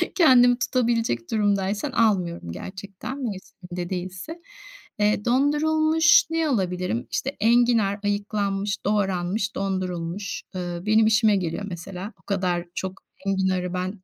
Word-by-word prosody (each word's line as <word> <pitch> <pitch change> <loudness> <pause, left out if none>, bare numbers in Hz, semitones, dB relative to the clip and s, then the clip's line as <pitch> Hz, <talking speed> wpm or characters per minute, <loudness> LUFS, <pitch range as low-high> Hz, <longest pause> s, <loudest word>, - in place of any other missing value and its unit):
kendimi 245 -8 +6
tutabilecek 230 - 0
durumdaysan 205 +3 0
almıyorum 185 - +1
gerçekten, 195 - -7
mevsiminde 180 -4 -6
değilse. 185 - -6 0.6
Eee, 210 0 +2
dondurulmuş 310 +5 +4
ne 325 -1 0
alabilirim? 180 - -1
İşte 270 - -1
enginar 230 -3 +3
ayıklanmış, 205 0 -1
doğranmış 195 0 0
dondurulmuş 185 0 -3
ııı 175 0 -4
benim 220 +1 +4
işime 220 -1 +4
geliyor 180 0 -2
mesela. 185 +3 -7
O - - -47
kadar 180 -3 -1
çok 190 0 -5 0.2
enginarı 190 -2 0
ben 185 +2 -4
200 Hz, 110 wpm, -24 LUFS, 185-230 Hz, 0.6 s, kendimi